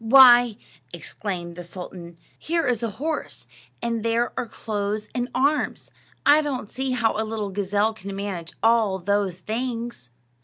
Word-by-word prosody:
"Why," 245 -2 +8 0.3
exclaimed 175 -4 -5
the 175 - -6
sultan, 175 -1 -9 0.2
"here 335 +1 0
is 245 -3 +1
a 230 - -1
horse, 310 - -3 0.4
and 230 -1 -1
there 230 +1 +1
are 240 - -2
clothes 210 -1 -3
and 245 0 -1
arms. 285 +4 +1 0.3
I 295 +2 +7
don't 265 -8 -3
see 265 0 -2
how 235 -3 +1
a 220 - 0
little 215 -2 -3
gazelle 205 +2 +1
can 200 -2 -7
manage 195 -4 -4
all 225 -4 +4
those 195 -1 0
things." 230 - -4
220 Hz, 150 wpm, -24 LUFS, 200-245 Hz, 0.4 s, Why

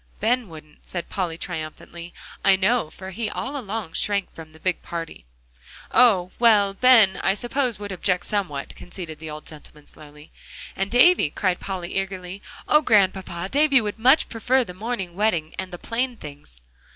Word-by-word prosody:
"Ben 235 0 0
wouldn't," 155 -2 -14
said 175 -2 -6
Polly 175 -4 -3
triumphantly, 170 +2 -7 0.3
"I 195 - +6
know, 190 -2 +1
for 190 +3 -9
he 215 +3 -3
all 275 +6 -5
along 215 - -5
shrank 200 -2 -1
from 160 -1 -11
the 160 - -17
big 185 +1 -1
party." 165 - -7 0.7
"Oh! 200 -7 +5
well, 210 -4 +4
Ben, 220 -3 +5
I 190 - +2
suppose, 245 +1 -1
would 205 0 -7
object 180 -1 -1
somewhat," 180 -10 -3
conceded 175 -3 -9
the 160 0 -7
old 150 0 -8
gentleman 150 -1 -11
slowly. 150 0 -14 0.4
"And 195 +1 -2
Davie," 245 - +5
cried 185 +3 -1
Polly 185 -3 -5
eagerly; 190 0 -6 0.3
"Oh, 300 - +5
Grandpapa! 190 - +1
David 285 -2 +4
would 210 0 -4
much 260 +7 +5
prefer 250 +3 +1
the 180 - -9
morning 195 -2 -4
wedding 175 -7 0
and 190 0 -4
the 175 - -7
plain 240 +5 -2
things." 145 - -12
190 Hz, 165 wpm, -23 LUFS, 170-225 Hz, 0.7 s, I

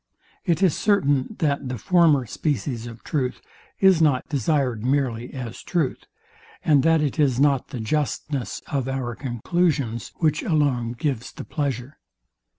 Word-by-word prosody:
It 170 +2 +1
is 180 -6 +4
certain, 150 -5 +1
that 140 -5 0
the 125 - -3
former 160 - +4
species 125 -2 -2
of 115 0 -10
truth, 130 -4 -2 0.4
is 190 -4 +5
not 145 -5 +3
desired 135 -5 0
merely 125 -3 0
as 125 -1 -6
truth, 160 -8 -1 0.6
and 145 -3 +5
that 165 +2 +4
it 150 +2 -1
is 135 -4 +3
not 140 -2 +3
the 130 - -6
justness 135 -1 -2
of 135 -3 -2
our 130 -3 -2
conclusions, 130 - -1
which 155 -2 +1
alone 135 -7 +1
gives 125 -1 -3
the - - -9
pleasure. 140 -1 -3
140 Hz, 145 wpm, -24 LUFS, 125-155 Hz, 0.6 s, is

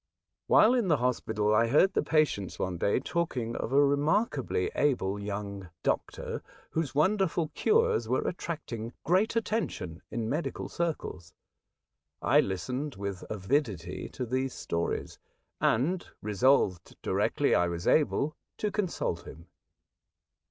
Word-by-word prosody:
While 225 - +6
in 240 -6 +2
the 155 -4 +4
hospital 110 -4 0
I 115 +2 +4
heard 155 +10 +4
the - - +2
patients 100 - +1
one 90 -2 -2
day 100 - +2
talking 130 -7 -2
of - - -3
a 140 +1 +5
remarkably 145 - +1
able 105 -9 +1
young 100 -2 -5
doctor, - - -2 0.3
whose 160 -4 -2
wonderful 170 -1 +2
cures 455 - +2
were - - +1
attracting 125 -10 -4
great 190 +7 +2
attention 175 - -2
in 115 -1 -3
medical 150 +8 -2
circles. 160 - -4 0.8
I - - +4
listened 125 - -2
with 100 -1 -5
avidity 100 - -1
to 125 - -3
these 130 +2 -1
stories, 85 0 -3 0.4
and 165 +11 +2 0.2
resolved 105 -4 +2
directly - - +1
I 90 - +4
was 85 0 -4
able 150 0 +2 0.2
to 210 - -1
consult 175 - -2
him. 85 +3 -12
130 Hz, 125 wpm, -29 LUFS, 100-160 Hz, 0.8 s, While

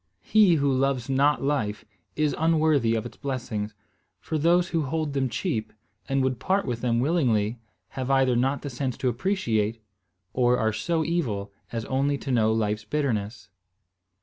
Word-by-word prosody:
He 210 -5 +5
who 140 -2 +2
loves 135 -1 0
not 140 +2 +3
life 125 -8 -1 0.3
is 155 -1 +1
unworthy 155 -7 +3
of 115 - -2
its 120 - -9
blessings; 110 -6 -4 0.4
for 155 - -3
those 175 +3 +3
who 165 - 0
hold 155 +1 -2
them 135 -2 0
cheap, 115 - -2 0.4
and 135 0 +1
would 130 -2 -1
part 195 +1 +1
with 120 -3 -3
them 120 -2 +1
willingly, 120 -7 +1 0.3
have 130 -1 -4
either 135 -2 +3
not 135 +4 0
the 145 - -4
sense 130 0 -3
to 130 - 0
appreciate, 115 - 0 0.5
or 125 -1 +3
are 110 -1 +1
so 160 +9 -1
evil 110 -13 -2 0.2
as 115 -2 -3
only 140 +2 0
to 135 - -5
know 110 -3 +3
life's 105 -1 0
bitterness. 110 -6 -2
130 Hz, 165 wpm, -26 LUFS, 115-150 Hz, 0.5 s, He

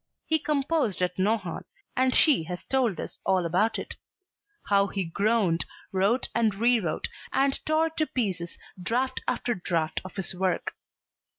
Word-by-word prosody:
He 315 0 +2
composed 280 - 0
at 180 +1 -1
Nohant, 195 -4 0 0.3
and 255 0 +2
she 275 - +5
has 180 +1 -5
told 250 -8 +1
us - - -6
all 185 -2 +2
about 185 +7 +2
it; - - -5 0.7
how 200 -1 +3
he 195 0 -2
groaned, 200 0 +1 0.3
wrote 200 +7 +2
and 225 -4 +2
re 235 +3 +4
wrote 165 -7 -2 0.2
and 270 +1 +1
tore 315 +1 +2
to 315 -1 0
pieces 185 -8 -2 0.2
draft 245 +8 0
after 240 - 0
draft 165 -5 -1
of 185 - -10
his 195 -2 -3
work. 185 0 0
205 Hz, 155 wpm, -27 LUFS, 180-255 Hz, 0.7 s, she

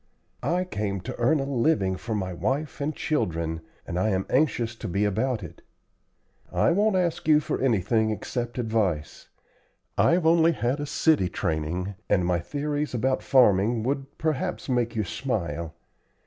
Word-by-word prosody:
I 170 +8 +1
came 100 - -3
to - - -6
earn 135 +6 +3
a - - 0
living 130 -7 +1
for 110 +4 -4
my 95 -3 -2
wife 140 - -2
and 150 +2 -1
children, 85 - -1 0.2
and 85 - -3
I 110 - +2
am 95 -2 0
anxious 125 -5 +2
to - - -5
be 100 +4 0
about 110 +2 0
it. 85 - -10 0.9
I - - +3
won't 205 +3 +2
ask 175 -4 0
you 150 -1 +6
for 150 - -3
anything 110 -2 +2
except 120 +3 -3
advice. 110 -10 -1 0.7
I've 170 0 +4
only 165 0 +5
had 130 +1 -1
a 145 - -3
city 145 - +2
training, 85 +4 -2 0.2
and 90 -3 +3
my 90 -1 +1
theories 145 - -3
about 130 +3 +1
farming 115 -3 +4
would 135 +2 -3
perhaps 155 -4 -2
make 120 -3 0
you 110 - +1
smile. 85 - -3
120 Hz, 160 wpm, -26 LUFS, 95-145 Hz, 0.9 s, you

